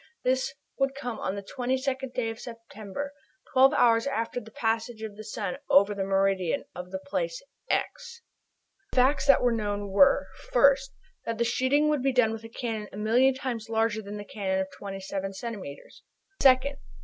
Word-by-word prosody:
This 260 Hz, +1 st, 0 dB, 0.2 s
would 270 Hz, 0 st, +1 dB
come 245 Hz, -4 st, -5 dB
on 190 Hz, -, -2 dB
the 200 Hz, -, -6 dB
22d 260 Hz, +3 st, -2 dB
day 225 Hz, -2 st, 0 dB
of 225 Hz, -, -10 dB
September, 230 Hz, +3 st, -7 dB, 0.4 s
twelve 265 Hz, 0 st, +7 dB
hours 230 Hz, -1 st, +4 dB
after 245 Hz, -3 st, -2 dB
the 220 Hz, -, -12 dB
passage 225 Hz, 0 st, -2 dB
of 215 Hz, -2 st, -6 dB
the 215 Hz, -, -9 dB
sun 205 Hz, -3 st, -4 dB
over 200 Hz, +2 st, +5 dB
the 200 Hz, -1 st, -2 dB
meridian 195 Hz, -2 st, +1 dB
of 180 Hz, 0 st, -7 dB
the 190 Hz, -, -3 dB
place -, -, -3 dB, 0.3 s
"x." 475 Hz, -2 st, -2 dB, 0.7 s
The -, -, -10 dB
facts 265 Hz, +3 st, +3 dB
that 275 Hz, -, +6 dB
were 245 Hz, -, +4 dB
known 205 Hz, -2 st, -2 dB
were: 190 Hz, -1 st, +5 dB, 0.3 s
1st. 270 Hz, +1 st, +5 dB, 0.4 s
That 230 Hz, -1 st, -2 dB
the 235 Hz, -, +2 dB
shooting 270 Hz, +5 st, +2 dB
would 300 Hz, -3 st, +1 dB
be 270 Hz, 0 st, +1 dB
done 250 Hz, -3 st, +4 dB
with 225 Hz, 0 st, -6 dB
a 225 Hz, -, -9 dB
cannon 225 Hz, -3 st, -4 dB
a -, -, -9 dB
million 245 Hz, +5 st, +3 dB
times 245 Hz, -5 st, -4 dB
larger 225 Hz, -1 st, +1 dB
than 205 Hz, 0 st, -7 dB
the 205 Hz, -, -7 dB
cannon 190 Hz, -2 st, -2 dB
of 190 Hz, -, -5 dB
27 195 Hz, 0 st, -5 dB
centimetres. 195 Hz, -8 st, -8 dB, 0.4 s
2d. 260 Hz, +1 st, +5 dB
230 Hz, 180 wpm, -27 LUFS, 205-260 Hz, 0.7 s, twelve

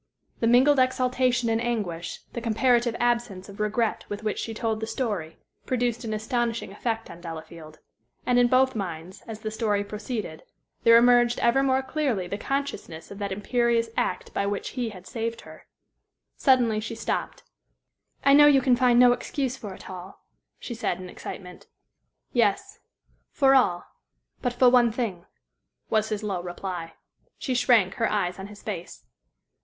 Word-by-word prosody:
The 230 Hz, -, +1 dB
mingled 260 Hz, +4 st, +5 dB
exaltation 255 Hz, -1 st, +2 dB
and 225 Hz, 0 st, +1 dB
anguish, 205 Hz, -8 st, -3 dB
the 235 Hz, -, -4 dB
comparative 235 Hz, +1 st, +2 dB
absence 235 Hz, -6 st, 0 dB
of 200 Hz, -, -12 dB
regret 215 Hz, +1 st, 0 dB
with 205 Hz, +1 st, -5 dB
which 215 Hz, -, -2 dB
she 225 Hz, -, -4 dB
told 220 Hz, 0 st, -2 dB
the 220 Hz, -, -4 dB
story, 210 Hz, -9 st, -3 dB, 0.3 s
produced 245 Hz, -2 st, 0 dB
an 225 Hz, -, -4 dB
astonishing 230 Hz, 0 st, -2 dB
effect 225 Hz, +2 st, -3 dB
on 170 Hz, -, -12 dB
Delafield. 160 Hz, -1 st, -9 dB, 0.5 s
And 245 Hz, 0 st, +3 dB
in 245 Hz, -, +5 dB
both 260 Hz, +1 st, +3 dB
minds, 180 Hz, -2 st, -5 dB
as 220 Hz, -2 st, -7 dB
the 215 Hz, -, -4 dB
story 210 Hz, -2 st, 0 dB
proceeded, 210 Hz, -5 st, -5 dB, 0.4 s
there 230 Hz, 0 st, +7 dB
emerged 240 Hz, 0 st, +5 dB
ever 235 Hz, +3 st, +4 dB
more 265 Hz, -1 st, +2 dB
clearly 260 Hz, -, -1 dB
the 200 Hz, +4 st, -5 dB
consciousness 275 Hz, -, -4 dB
of 200 Hz, -, -9 dB
that 200 Hz, -1 st, -3 dB
imperious 235 Hz, +3 st, +1 dB
act -, -, -2 dB
by 200 Hz, -, 0 dB
which 200 Hz, 0 st, -3 dB
he 245 Hz, -3 st, -3 dB
had 185 Hz, -4 st, -12 dB
saved 230 Hz, 0 st, -4 dB
her. -, -, -14 dB, 0.7 s
Suddenly 245 Hz, -5 st, +3 dB
she 225 Hz, +1 st, -5 dB
stopped. -, -, -3 dB, 0.8 s
"I 275 Hz, -, +6 dB
know 295 Hz, +1 st, +8 dB
you 285 Hz, -2 st, +6 dB
can 255 Hz, -1 st, +3 dB
find 245 Hz, -1 st, +3 dB
no 250 Hz, 0 st, +7 dB
excuse 260 Hz, +1 st, -2 dB
for 210 Hz, -6 st, -8 dB
it -, -, -13 dB
all," 185 Hz, +1 st, -10 dB, 0.3 s
she 245 Hz, -, -7 dB
said, 185 Hz, -5 st, -2 dB
in 185 Hz, -1 st, -8 dB
excitement. 180 Hz, 0 st, -9 dB, 0.7 s
"Yes; 245 Hz, -, +1 dB, 0.5 s
for 270 Hz, -1 st, +4 dB
all 190 Hz, -10 st, +3 dB, 0.6 s
but 245 Hz, -2 st, -1 dB
for 250 Hz, +1 st, +4 dB
one 240 Hz, -2 st, +5 dB
thing," 215 Hz, -7 st, -4 dB, 0.6 s
was 220 Hz, 0 st, +2 dB
his 215 Hz, -1 st, -3 dB
low 195 Hz, -4 st, -2 dB
reply. 175 Hz, -2 st, -6 dB, 0.4 s
She 260 Hz, -, -2 dB
shrank, 235 Hz, -6 st, +3 dB
her 230 Hz, -, +1 dB
eyes 185 Hz, -3 st, -1 dB
on 190 Hz, -, -6 dB
his 205 Hz, 0 st, -13 dB
face. 180 Hz, -5 st, -6 dB
225 Hz, 165 wpm, -26 LUFS, 200-245 Hz, 0.8 s, know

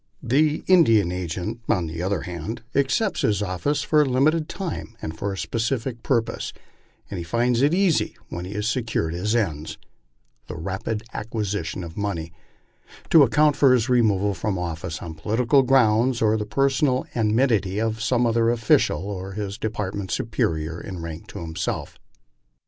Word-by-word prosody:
The 150 Hz, +5 st, +2 dB
Indian 115 Hz, -, +5 dB
agent, 90 Hz, +5 st, -4 dB
on 90 Hz, -6 st, +2 dB
the 80 Hz, +1 st, -5 dB
other 95 Hz, +3 st, -1 dB
hand, 90 Hz, +6 st, -6 dB
accepts 170 Hz, -, +1 dB
his 105 Hz, -1 st, +1 dB
office 105 Hz, +10 st, -1 dB
for 155 Hz, -1 st, +4 dB
a -, -, +3 dB
limited 150 Hz, +5 st, +2 dB
time 170 Hz, -, -5 dB
and 80 Hz, -, -5 dB
for 100 Hz, +5 st, -3 dB
a 95 Hz, -, -5 dB
specific 115 Hz, +3 st, -2 dB
purpose, 115 Hz, -3 st, -1 dB, 0.6 s
and -, -, -3 dB
he -, -, -4 dB
finds 120 Hz, +6 st, +1 dB
it 145 Hz, +2 st, +4 dB
easy 180 Hz, -2 st, +2 dB
when 85 Hz, -, -6 dB
he 95 Hz, -, -6 dB
has 105 Hz, +1 st, -2 dB
secured 110 Hz, -8 st, -1 dB
his 105 Hz, +6 st, -1 dB
ends 80 Hz, -9 st, -1 dB, 0.7 s
(tiie 80 Hz, -, -5 dB
rapid 100 Hz, +3 st, -3 dB
acquisition 105 Hz, -6 st, -3 dB
of 85 Hz, 0 st, -9 dB
money) 85 Hz, -6 st, -3 dB, 0.8 s
to 160 Hz, -, +8 dB
account 145 Hz, +3 st, +4 dB
for 140 Hz, -3 st, +5 dB
his 120 Hz, +1 st, 0 dB
removal 105 Hz, -5 st, +3 dB
from 100 Hz, 0 st, -2 dB
office 85 Hz, -1 st, -4 dB
on 85 Hz, -2 st, -6 dB
political 115 Hz, -, +2 dB
grounds 125 Hz, -2 st, +3 dB
or 110 Hz, -1 st, +3 dB
the 105 Hz, -1 st, -2 dB
personal 135 Hz, -1 st, +1 dB
enmity 110 Hz, -3 st, +1 dB
of 110 Hz, 0 st, -1 dB
some 120 Hz, +2 st, +2 dB
other 115 Hz, 0 st, +2 dB
official 105 Hz, -4 st, +1 dB
of 95 Hz, -, -8 dB
his 105 Hz, 0 st, -4 dB
department 105 Hz, -3 st, -3 dB
superior 80 Hz, -7 st, -1 dB
in 95 Hz, -3 st, -7 dB
rank 85 Hz, +5 st, -7 dB
to 100 Hz, -, -9 dB
himself. 80 Hz, -1 st, -4 dB
110 Hz, 160 wpm, -24 LUFS, 95-125 Hz, 0.8 s, to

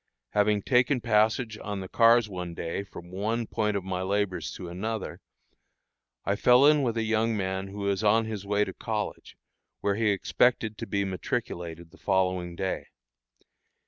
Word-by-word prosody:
Having 105 Hz, -1 st, +2 dB
taken 125 Hz, +1 st, +3 dB
passage 110 Hz, 0 st, +1 dB
on 100 Hz, -1 st, -4 dB
the 95 Hz, -, -6 dB
cars 115 Hz, +2 st, +5 dB
one 90 Hz, -4 st, -6 dB
day 85 Hz, +4 st, -3 dB
from 90 Hz, -3 st, -11 dB
one 110 Hz, +5 st, -1 dB
point 105 Hz, -1 st, 0 dB
of 100 Hz, -, -4 dB
my 95 Hz, -1 st, -3 dB
labors 100 Hz, 0 st, -1 dB
to 90 Hz, -, -7 dB
another, 100 Hz, +4 st, -4 dB, 1.0 s
I 100 Hz, -, +1 dB
fell 125 Hz, +5 st, +6 dB
in 150 Hz, 0 st, +6 dB
with 120 Hz, -4 st, 0 dB
a 115 Hz, -, +1 dB
young 110 Hz, 0 st, +1 dB
man 95 Hz, 0 st, -2 dB
who 100 Hz, +1 st, -7 dB
was 100 Hz, +1 st, 0 dB
on 110 Hz, +2 st, +4 dB
his 110 Hz, -3 st, -5 dB
way 105 Hz, +1 st, +1 dB
to 95 Hz, -, -6 dB
college, 105 Hz, +1 st, -4 dB, 0.4 s
where 100 Hz, -, +1 dB
he 110 Hz, +1 st, +1 dB
expected 110 Hz, +2 st, +2 dB
to -, -, -5 dB
be 100 Hz, 0 st, 0 dB
matriculated 85 Hz, -2 st, -4 dB
the -, -, -18 dB
following 90 Hz, -3 st, 0 dB
day. 95 Hz, +1 st, -3 dB
105 Hz, 170 wpm, -28 LUFS, 95-110 Hz, 1.0 s, fell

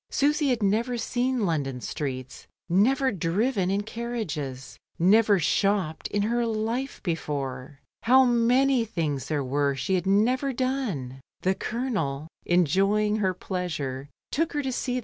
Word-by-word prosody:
Susy 295 Hz, +1 st, +2 dB
had 240 Hz, -4 st, 0 dB
never 230 Hz, +5 st, +1 dB
seen 245 Hz, -1 st, 0 dB
London 140 Hz, -7 st, -1 dB
streets, 130 Hz, -1 st, -5 dB, 0.2 s
never 260 Hz, +9 st, +3 dB
driven 190 Hz, +3 st, 0 dB
in 200 Hz, +2 st, 0 dB
carriages, 170 Hz, -, -5 dB, 0.2 s
never 205 Hz, +4 st, +5 dB
shopped 185 Hz, -1 st, 0 dB
in 205 Hz, 0 st, -1 dB
her 235 Hz, +3 st, +1 dB
life 230 Hz, +4 st, -2 dB
before. 140 Hz, -5 st, -4 dB, 0.2 s
How 260 Hz, +3 st, +6 dB
many 245 Hz, +2 st, +3 dB
things 155 Hz, -, -2 dB
there 150 Hz, -3 st, -1 dB
were 140 Hz, +1 st, 0 dB
she 135 Hz, +8 st, -2 dB
had 185 Hz, 0 st, 0 dB
never 250 Hz, +7 st, +2 dB
done! 230 Hz, -, -2 dB, 0.2 s
The 190 Hz, -, +2 dB
Colonel, 195 Hz, -, -3 dB, 0.2 s
enjoying 195 Hz, +5 st, +2 dB
her 190 Hz, -3 st, 0 dB
pleasure, 150 Hz, -9 st, -4 dB, 0.2 s
took 325 Hz, +3 st, 0 dB
her 295 Hz, -1 st, -1 dB
to 265 Hz, -, -2 dB
se^. 250 Hz, 0 st, -1 dB
200 Hz, 135 wpm, -26 LUFS, 150-245 Hz, 0.2 s, How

